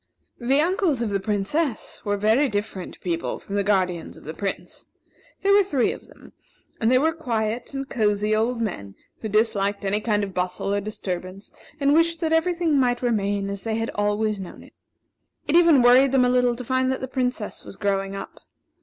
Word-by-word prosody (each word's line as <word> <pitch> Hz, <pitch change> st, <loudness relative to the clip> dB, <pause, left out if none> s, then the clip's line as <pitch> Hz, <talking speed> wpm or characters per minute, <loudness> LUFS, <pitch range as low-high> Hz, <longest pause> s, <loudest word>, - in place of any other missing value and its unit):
The 270 Hz, +4 st, +2 dB
uncles 340 Hz, -, +1 dB
of 215 Hz, -, -2 dB
the 200 Hz, -, 0 dB
Princess 215 Hz, -, -2 dB
were 205 Hz, 0 st, 0 dB
very 220 Hz, +8 st, +3 dB
different 205 Hz, -3 st, -4 dB
people 170 Hz, -2 st, -2 dB
from 195 Hz, -, -10 dB
the 200 Hz, -, +1 dB
guardians 185 Hz, -4 st, 0 dB
of -, -, -15 dB
the 155 Hz, -, -6 dB
Prince. 195 Hz, +3 st, -5 dB, 0.6 s
There 400 Hz, 0 st, +4 dB
were 405 Hz, -, +7 dB
three 285 Hz, -11 st, +1 dB
of -, -, -10 dB
them, -, -, -17 dB, 0.5 s
and 225 Hz, -, +2 dB
they 255 Hz, -, +5 dB
were 315 Hz, +5 st, +3 dB
very 325 Hz, -, -13 dB
quiet 230 Hz, 0 st, -2 dB
and 270 Hz, 0 st, -4 dB
cosey 210 Hz, -2 st, +1 dB
old 230 Hz, +2 st, 0 dB
men, 100 Hz, -, -4 dB, 0.3 s
who 220 Hz, -, -4 dB
disliked 205 Hz, -2 st, +1 dB
any 205 Hz, +2 st, 0 dB
kind 210 Hz, -2 st, +1 dB
of 195 Hz, -2 st, -5 dB
bustle 180 Hz, +2 st, -2 dB
or 205 Hz, -, 0 dB
disturbance, 190 Hz, -2 st, -6 dB, 0.3 s
and 280 Hz, 0 st, +3 dB
wished 330 Hz, +1 st, +3 dB
that 320 Hz, -1 st, +1 dB
every 335 Hz, +2 st, +2 dB
thing 325 Hz, -5 st, +2 dB
might 245 Hz, -1 st, +1 dB
remain 205 Hz, -4 st, 0 dB
as 200 Hz, 0 st, -5 dB
they 220 Hz, +1 st, -2 dB
had 225 Hz, +1 st, -2 dB
always 205 Hz, 0 st, 0 dB
known 185 Hz, -, -10 dB
it. -, -, -18 dB, 0.7 s
It 295 Hz, -, +2 dB
even 335 Hz, -7 st, +6 dB
worried 255 Hz, +2 st, +6 dB
them 255 Hz, -2 st, +5 dB
a -, -, +2 dB
little 250 Hz, -1 st, +2 dB
to 250 Hz, -, -7 dB
find 260 Hz, +1 st, +1 dB
that 260 Hz, -, -3 dB
the 260 Hz, -, -3 dB
Princess 250 Hz, -4 st, -3 dB
was 195 Hz, -, -10 dB
growing 195 Hz, -1 st, -1 dB
up. 195 Hz, -, -8 dB
220 Hz, 205 wpm, -24 LUFS, 200-265 Hz, 0.7 s, were